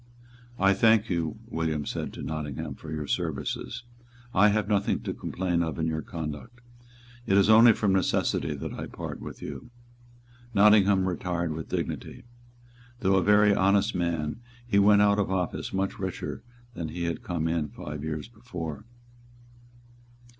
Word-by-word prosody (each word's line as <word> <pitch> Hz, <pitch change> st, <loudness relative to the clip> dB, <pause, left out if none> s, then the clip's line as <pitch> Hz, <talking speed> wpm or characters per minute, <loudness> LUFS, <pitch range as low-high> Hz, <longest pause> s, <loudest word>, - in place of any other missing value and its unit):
"I 95 Hz, 0 st, +4 dB
thank 110 Hz, +1 st, +4 dB
you," 85 Hz, -3 st, -1 dB
William 80 Hz, -3 st, -2 dB
said -, -, -4 dB
to -, -, -7 dB
Nottingham, 75 Hz, -1 st, -4 dB
"for 75 Hz, +2 st, -10 dB
your 75 Hz, -1 st, -3 dB
services. -, -, -3 dB, 0.5 s
I 100 Hz, +3 st, +6 dB
have 105 Hz, -1 st, +1 dB
nothing 100 Hz, -1 st, +1 dB
to -, -, -4 dB
complain 90 Hz, -2 st, -1 dB
of 80 Hz, -2 st, -2 dB
in 80 Hz, -, -1 dB
your 80 Hz, -1 st, -1 dB
conduct. 80 Hz, +11 st, -7 dB, 0.7 s
It 95 Hz, -, +4 dB
is 100 Hz, +2 st, +5 dB
only 115 Hz, +1 st, +8 dB
from 100 Hz, -2 st, +1 dB
necessity 95 Hz, -1 st, +1 dB
that -, -, -6 dB
I -, -, -6 dB
part -, -, -7 dB
with -, -, -8 dB
you." 120 Hz, -, -7 dB, 0.9 s
Nottingham 100 Hz, -2 st, +5 dB
retired 85 Hz, -2 st, -2 dB
with 80 Hz, 0 st, -6 dB
dignity. -, -, -4 dB, 0.8 s
Though 95 Hz, 0 st, +3 dB
a -, -, +4 dB
very 105 Hz, +1 st, +5 dB
honest 100 Hz, +3 st, +3 dB
man, 85 Hz, -2 st, -2 dB, 0.3 s
he 100 Hz, -4 st, +2 dB
went 105 Hz, +1 st, +6 dB
out 100 Hz, 0 st, +3 dB
of 100 Hz, -, 0 dB
office 90 Hz, -3 st, -2 dB
much 95 Hz, 0 st, -2 dB
richer 95 Hz, -2 st, -4 dB, 0.3 s
than 85 Hz, -7 st, -5 dB
he 85 Hz, +2 st, -4 dB
had 85 Hz, -2 st, -2 dB
come 85 Hz, -2 st, -2 dB
in 80 Hz, -2 st, 0 dB
five 75 Hz, 0 st, -7 dB
years 80 Hz, +2 st, -4 dB
before. 105 Hz, -, -7 dB
95 Hz, 155 wpm, -27 LUFS, 80-100 Hz, 0.9 s, only